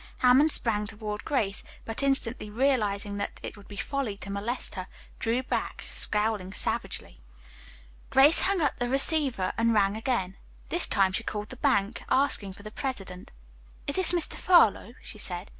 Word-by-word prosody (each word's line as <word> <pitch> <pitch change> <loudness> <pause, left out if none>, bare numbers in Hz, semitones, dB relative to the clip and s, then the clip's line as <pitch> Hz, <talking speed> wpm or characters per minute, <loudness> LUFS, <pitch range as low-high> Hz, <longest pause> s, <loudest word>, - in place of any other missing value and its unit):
Hammond 260 +5 +5
sprang 210 -5 +1
toward 210 0 -6
Grace, 215 -10 -1 0.2
but 225 +3 -1
instantly 260 -5 0
realizing 210 -5 0
that 200 - -5
it - - -6
would 205 -1 -15
be 205 - -10
folly 225 -2 -3
to 200 - -8
molest 210 +6 -3
her, 185 -3 -6 0.3
drew 235 +3 0
back, - - -3
scowling 210 -3 -1
savagely. - - -1 0.9
Grace 285 +5 +5
hung 390 -2 +1
up 290 - +1
the 245 0 -1
receiver 270 - +1
and 230 0 +2
rang 200 -1 +2
again. 220 -5 -2 0.3
This 345 - +7
time 195 -1 +2
she 190 - -2
called 210 -2 -5
the - - -8
bank, 200 0 0
asking 240 -8 +2
for 205 - -15
the 215 - -8
president. 195 -9 -6 0.6
"Is 285 - -2
this 375 -3 +7
Mr. 350 -2 -1
Furlow?" 245 - +3
she 215 - -9
said. 180 0 -4
220 Hz, 165 wpm, -27 LUFS, 200-270 Hz, 0.9 s, This